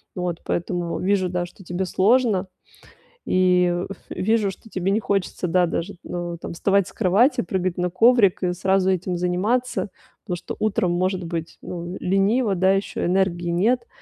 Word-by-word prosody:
Вот, 180 -2 -3
поэтому 175 0 -2
вижу, 190 -1 +1
да, 175 0 -2
что 185 +2 -15
тебе 175 +2 -2
сложно, 205 0 +2 0.8
и 180 -1 +3 0.2
в 195 - -6 0.2
вижу, 215 0 +1
что 225 - -15
тебе 190 -1 -1
не 210 - +2
хочется, 195 -3 -1
да, 180 +1 +3
даже, 170 +3 -3
э, 175 -1 -4
там - - -6
вставать 195 +2 +1
с - - -17
кровати, 220 +7 +3
прыгать 185 0 -2
на 180 0 0
коврик 205 0 +4
и 180 - +2
сразу 190 +1 +1
этим 185 -1 -1
заниматься, 205 +9 0 0.4
потому 180 - -2
что 175 - -7
утром 200 -4 +1
может 185 +1 0
быть, 165 -1 -5
ну, 175 +1 -6
лениво, 195 +3 +2
да, 190 +2 +3
еще 195 +1 -2
энергии 175 -1 +1
нет. 235 +8 +1
185 Hz, 165 wpm, -23 LUFS, 175-200 Hz, 0.8 s, коврик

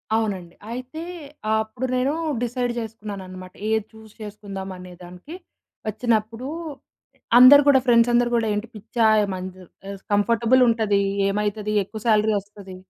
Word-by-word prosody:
అవునండి. 195 -6 -2 0.2
అయితే 255 +7 -6 0.5
ఆహ్, 220 0 +2
అప్పుడు 240 +4 -5
నేను 260 +3 +1 0.3
డిసైడ్ 245 0 -2
చేసుకున్నాననమాట. 200 -5 -8 0.2
ఏది 220 -1 0
చూస్ 220 -1 -15
చేసుకుందాం 200 -2 -7
అనే 180 0 -11
దానికి, 180 - -11 0.5
ఒచ్చినప్పుడు 225 +2 -1 0.9
అందరూ 260 +3 +9
కూడా, 275 -2 +6
ఫ్రెండ్స్ 235 -1 +4
అందరూ 240 0 +3
కూడా 230 -1 +1
ఏంటి 210 +3 -3
"పిచ్చా! 220 +2 -1 0.2
ఏమన్ 185 -2 -4
చెప్పేసి 195 +2 -12
కంఫర్టబుల్ 230 +4 +3
ఉంటది, 220 -3 +1 0.3
ఏమైతది? 210 +1 -2
ఎక్కువ 215 +3 -9
సాలరీ 215 -1 +3
ఒస్తది. 200 -1 -13
215 Hz, 130 wpm, -23 LUFS, 200-235 Hz, 0.9 s, అందరూ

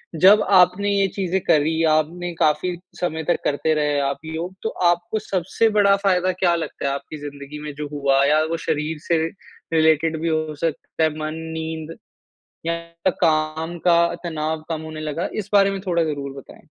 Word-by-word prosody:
जब 195 +6 +7
आपने 185 +2 +5
ये 200 -1 +2
चीज़ें 190 -1 0
करी 160 0 +2
आपने 170 +3 0
काफ़ी 170 +3 +2 0.2
समय 160 -2 -2
तक 175 - +3
करते 150 +2 +1
रहे 150 -1 +1
आप 140 - -3
योग 165 +3 -4
तो 220 - 0 0.2
आपको 175 +5 0
सबसे 190 +4 0
बड़ा 200 -1 +6
फ़ायदा 185 -1 +3
क्या 180 -1 +1
लगता 165 -4 -4
है 140 - 0
आपकी 140 +2 -6
ज़िन्दगी 145 0 -8
में 150 -1 -6
जो 150 0 -4
हुआ? 140 -1 +2
या 155 +2 +4
वो 165 +1 -2
शरीर 160 -1 -2
से 170 - +3 0.6
रिलेटेड 160 0 +3
भी 165 - -1
हो 155 -1 -1
सकता 160 +1 -2
है। 160 - +4
मन, 155 0 -3 0.2
नींद 160 0 -5 0.7
या 170 +2 -2
काम 160 +1 +1
का 170 -1 +4
तनाव 160 -1 -2
कम 160 -2 -2
होने 155 0 -7
लगा। 155 +2 -3
इस - - -18
बारे 200 -1 +5
में 195 -1 -4
थोड़ा 170 -2 +2
ज़रूर 140 -3 -4
बताएँ। 135 - -14
160 Hz, 180 wpm, -22 LUFS, 155-175 Hz, 0.7 s, जब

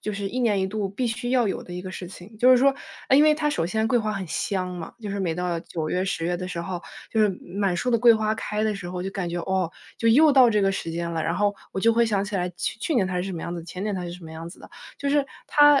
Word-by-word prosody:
就 210 - -3
是 200 0 -3
一 255 - -3
年 210 -5 +2
一 190 - +1
度 205 0 -2
必 240 +6 -2
须 240 +2 -3
要 245 -4 +3
有 195 - -2
的 180 - -10
一 180 - -4
个 185 - -7
事 180 - -7
情。 190 +4 -12
就 245 +4 +5
是 255 - +8
说， 270 +2 +4 0.4
诶， 265 - +7
因 290 - +7
为 305 0 +6
它 300 0 0
首 170 - 0
先 220 +5 0
桂 245 +2 +2
花 215 -2 0
很 195 -2 -4
香 185 +2 -2
嘛， 175 -2 -7
就 215 - -6
是 200 0 -3
每 175 -3 0
到 175 0 -2
9 160 -2 -4
月、 185 +1 0
10 165 -3 -2
月 175 +1 0
的 185 +1 -5
时 170 -2 -4
候， 175 0 -5 0.3
就 220 - +2
是 210 - +5 0.2
满 195 -1 -1
树 250 +8 -1
的 - - +5
桂 235 0 +7
花 220 0 +1
开 210 0 -2
的 215 -1 +1
时 180 -3 -6
候， 180 0 -4
就 - - -2
感 190 -3 -3
觉， 175 - -2
哦， 185 -2 0 0.3
就 230 - +1
又 295 +6 +6
到 260 -3 +7
这 210 -2 +2
个 195 0 +2
时 165 - -4
间 170 +1 -3
了， 165 -1 -2
然 165 - 0
后 205 0 +2 0.2
我 - - -3
就 230 +3 +4
会 235 +1 +4
想 205 -3 0
起 205 0 -6
来 180 -1 0
去 180 - -3
去 325 - -1
年 195 -6 +3
它 185 -1 -3
是 180 - 0
什 190 +1 -4
么 170 - -5
样 170 - -4
子， 170 - -5
前 180 +3 -6
年 210 - -1
它 185 - -3
是 175 - -5
什 175 -1 -10
么 160 - -9
样 165 +1 -7
子 - - -13
的。 - - -13 0.3
就 280 - -2
是 285 0 +3 0.2
它 290 -1 +6
195 Hz, 340 characters per minute, -25 LUFS, 180-230 Hz, 0.4 s, 是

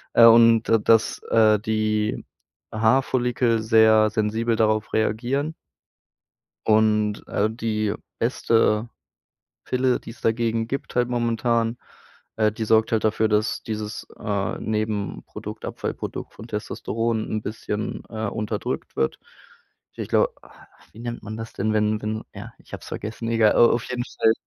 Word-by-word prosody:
äh, 115 - +9
und 115 -1 +6
da 115 - +6
dass, 110 +1 +2
äh, 110 -2 +5
die 110 0 -1 0.5
Haarfollikel 120 0 +2
sehr 110 -1 +5
sensibel 110 +2 0
darauf 110 -1 +1
reagieren. 125 +8 0 1.1
Und, 105 -1 +2
äh, 105 - +1
die 110 -2 -1 0.2
beste 115 -2 +1 0.8
Pille, 125 0 +1
die - - -10
es 115 - -16
dagegen 115 0 0
gibt 135 +3 -5
halt 120 0 +2
momentan. 115 -1 0 0.6
Äh, 110 -1 +3
die 110 +2 -4
sorgt 110 0 +3
halt 110 - +1
dafür, 110 0 +2
dass 105 +1 +1
dieses, 110 -1 -5
äh, 100 -3 -2
Nebenprodukt, 110 -2 -4
Abfallprodukt - - -5
von 110 - -11
Testosteron 115 +1 -2
'n 110 - -2
bisschen, 105 0 -4
äh, 110 -1 -3
unterdrückt 105 +1 -4
wird. 65 - -1 0.8
Ich - - -5
glaube - - +2
ah, - - -18 0.4
wie 110 - -13
nennt 120 0 -5
man 110 +1 -6
das 115 0 -7
denn, 110 +3 -1
wenn 105 0 +1
wenn 110 +1 -3
ja, - - -9
ich - - -20
habe - - -6
es - - -12
vergessen. 110 +2 -5
Egal, 115 -2 +4
äh, - - -3
auf 120 0 +5
jeden 125 -1 -3
Fall 110 - +2
110 Hz, 145 wpm, -23 LUFS, 110-115 Hz, 1.1 s, äh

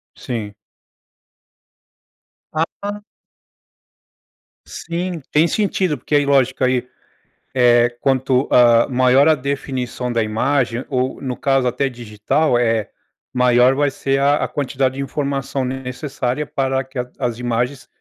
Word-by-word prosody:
Sim. 110 -4 -5 2.0
Ah. 200 +6 -3 1.6
Sim, 175 0 -4
tem 160 +3 +4
sentido, 190 -6 0
porque 140 - -4
aí 145 -1 +3
lógico, 130 -2 +2
aí, 125 -1 +1 0.7
eh, 120 -2 +4
quanto, 130 0 +1
hã, 120 -1 +5
maior 130 +2 +4
a 160 - +5
definição 130 -3 -3
da 115 -1 +1
imagem 120 +2 0
ou 130 -1 -2
no 130 -2 -4
caso 135 -2 +1
até 125 +3 0
digital, 120 +4 0
eh, 115 -3 0 0.4
maior 125 0 +4
vai 145 0 +1
ser 135 0 -1
a 145 +1 +2
a - - 0
quantidade 135 -2 -1
de 135 - -4
informação 140 -1 -2
necessária 130 +1 -3
para 135 -1 -1
que 130 +1 -12
a 125 - -4
as 120 -2 -2
imagens 125 +2 -2
130 Hz, 125 wpm, -19 LUFS, 125-140 Hz, 2.0 s, hã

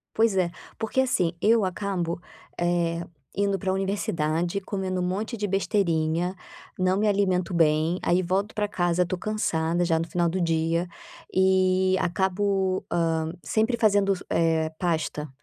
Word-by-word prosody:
Pois 225 -2 +3
é, 185 -2 +2 0.3
porque 225 +4 +1
assim, 180 -10 +1
eu 225 0 +4
acabo, 185 -3 -2 0.4
eh, 170 -1 0 0.3
indo 200 -1 +1
para 190 -2 -1
universidade, 175 -3 -1
comendo 190 -1 -3
um - - 0
monte 205 +6 -2
de 205 -1 -2
besteirinha, 180 -3 0 0.4
não 185 +1 +2
me 215 +1 +2
alimento 190 -3 +1
bem, 160 +1 +2
aí 180 +2 +2
volto 195 +4 -1
para 210 -1 0
casa, 175 -2 +1
estou 180 +1 -4
cansada 175 -5 0
já 165 -2 +2
no 165 - -3
final 175 0 +1
do 180 +3 -1
dia, 165 +1 +1 0.4
e 185 0 +3
acabo, 190 +1 0
hã, 160 -1 0
sempre 225 - +1
fazendo, 205 -3 +3 0.2
eh, 160 -1 +2
pasta, 160 -3 -1
185 Hz, 145 wpm, -26 LUFS, 170-200 Hz, 0.4 s, eu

